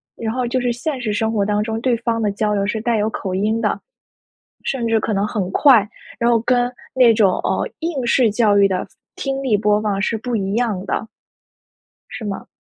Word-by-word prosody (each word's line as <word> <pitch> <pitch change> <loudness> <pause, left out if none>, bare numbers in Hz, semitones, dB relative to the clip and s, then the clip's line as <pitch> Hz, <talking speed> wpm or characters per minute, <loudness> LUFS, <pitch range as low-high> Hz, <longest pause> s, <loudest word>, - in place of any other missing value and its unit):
然 225 -1 -3
后 250 -1 -1
就 255 +2 0
是 245 -1 +1
现 270 +3 -3
实 215 -3 -1
生 220 +2 0
活 205 -2 +1
当 210 0 +1
中 220 0 -3
对 250 -1 +2
方 230 0 -1
的 210 -2 +1
交 210 +1 -1
流 200 -1 0
是 215 +2 -2
带 230 0 +1
有 210 0 +1
口 185 -3 -4
音 215 +4 0
的， - - 0 0.8
甚 260 -4 -2
至 225 -1 +2
可 220 - -2
能 200 +1 0
很 200 -5 -2
快， 240 -7 +5 0.3
然 235 - +2
后 235 -1 +4
跟 245 +1 +1 0.2
那 250 -3 +6
种， 200 -4 +4
呃， - - 0
应 315 -6 -2
试 235 -1 +4
教 210 -2 +3
育 200 - +6
的， 185 -1 -2 0.3
听 270 0 -3
力 230 -6 +2
播 210 0 +2
放 205 -2 -1
是 220 +2 0
不 240 +2 -3
一 195 -2 -1
样 220 -6 -1
的。 220 - -2 1.0
是 220 - -7
吗？ 200 -2 -5
220 Hz, 235 characters per minute, -20 LUFS, 205-240 Hz, 1.0 s, 那